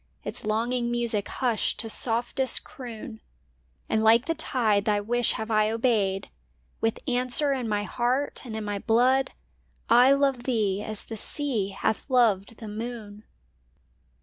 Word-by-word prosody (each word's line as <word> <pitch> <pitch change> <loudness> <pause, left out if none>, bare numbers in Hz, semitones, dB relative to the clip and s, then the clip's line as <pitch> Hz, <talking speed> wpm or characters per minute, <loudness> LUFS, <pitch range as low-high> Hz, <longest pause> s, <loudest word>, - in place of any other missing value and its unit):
Its - - -3
longing 235 +3 -1
music 235 -4 0
hushed 240 -4 -1
to 225 - 0
softest 240 +3 +1
croon; 230 -4 -9 0.7
And 220 0 +1
like 230 +3 +5
the 330 - 0
tide 225 -10 +1
thy 210 -1 +2
wish 235 +3 +1
have 220 +1 -5
I 215 0 +3
obeyed 220 -4 0 0.5
With 225 +5 -2
answer 255 +3 +2
in 250 -4 -3
my 205 -1 0
heart 250 +6 -1
and 230 -4 -7
in 220 - -4
my 205 -1 -3
blood 255 +5 +2 0.4
— - - -39 0.2
I 275 - +6
love 275 -3 +1
thee 210 -6 0
as 215 -1 -5
the 225 - -7
sea 245 -4 0
hath 200 +5 -2
loved 230 -4 +2
the 225 - -9
moon! 215 -1 -7
230 Hz, 150 wpm, -26 LUFS, 215-250 Hz, 0.7 s, I